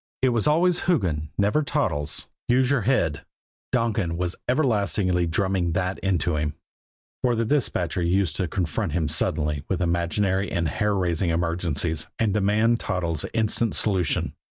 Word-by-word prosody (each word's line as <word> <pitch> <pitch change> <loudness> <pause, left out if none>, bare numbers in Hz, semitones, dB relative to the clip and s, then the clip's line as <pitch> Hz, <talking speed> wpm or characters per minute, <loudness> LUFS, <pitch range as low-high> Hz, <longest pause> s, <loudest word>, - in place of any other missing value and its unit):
_" - - -134 0.2
It 130 - +5
was 120 +2 +1
always 170 +4 +3
"Hoogan," 85 - +1
never 105 +9 +2
"Toddles." 105 - -1 0.2
"Use 130 +2 +3
your 140 -4 +2
head" 85 - +1 0.5
Donkin 110 -8 0
was 90 0 -2
everlastingly 100 - +1
drumming 90 0 0
that 90 +2 -1
into 90 -4 0
him; 75 -1 -2 0.7
for 125 -2 +2
the 115 0 0
dispatcher 110 - 0
used 85 -2 +1
to 90 - 0
confront 85 +1 -2
him 80 -2 0
suddenly 75 -1 0
with 95 - 0
imaginary 90 +3 0
and 85 -3 0
hair 105 +2 0
raising 90 -2 0
emergencies, 85 -2 -1
and 110 -3 +1
demand 105 +3 +2
Toddles' 85 -6 -2
instant 110 0 0
solution. 95 -6 +1
95 Hz, 150 wpm, -24 LUFS, 85-110 Hz, 0.7 s, It